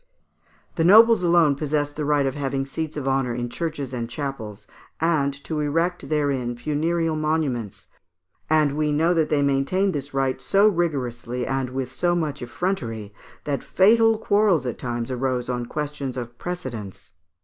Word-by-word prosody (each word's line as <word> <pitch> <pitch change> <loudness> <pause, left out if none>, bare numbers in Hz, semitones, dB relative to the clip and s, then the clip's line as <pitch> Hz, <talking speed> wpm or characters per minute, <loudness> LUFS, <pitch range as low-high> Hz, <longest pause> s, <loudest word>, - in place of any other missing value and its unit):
The 165 - +2
nobles 220 +4 +7
alone 170 -4 +4
possessed 145 0 -1
the 150 - -3
right 145 -1 +2
of 135 - 0
having 135 -1 -2
seats 155 +3 -5
of 140 -2 -3
honour 135 -3 0
in 120 0 -3
churches 145 -3 -4
and 120 -2 -2
in - - -9
chapels 115 -5 -6
(Fig. - - -26
28), 165 +1 +3
and 140 -1 -2
to 155 -2 -3
erect 165 +4 -1
therein 140 -5 0
funereal 160 +4 0
monuments, 150 -9 -2 0.6
and 155 -2 +3
we 150 +1 0
know 160 +4 +2
that 160 -3 +1
they 145 -2 +2
maintained 140 +8 +1
this 145 0 -4
right 135 -1 -1
so 200 +2 +4
rigorously 125 - -1
and 135 -1 -1
with 130 -1 -4
so 175 +6 0
much 155 -4 -2
effrontery, 120 - -3 0.3
that 145 -2 -2
fatal 225 +3 +4
quarrels 205 - +2
at 125 - -4
times 120 0 -3
arose 125 -1 -1
on 120 -1 -2
questions 145 -3 -4
of 120 -1 -6
precedence. 120 - -6
145 Hz, 170 wpm, -23 LUFS, 130-165 Hz, 0.6 s, nobles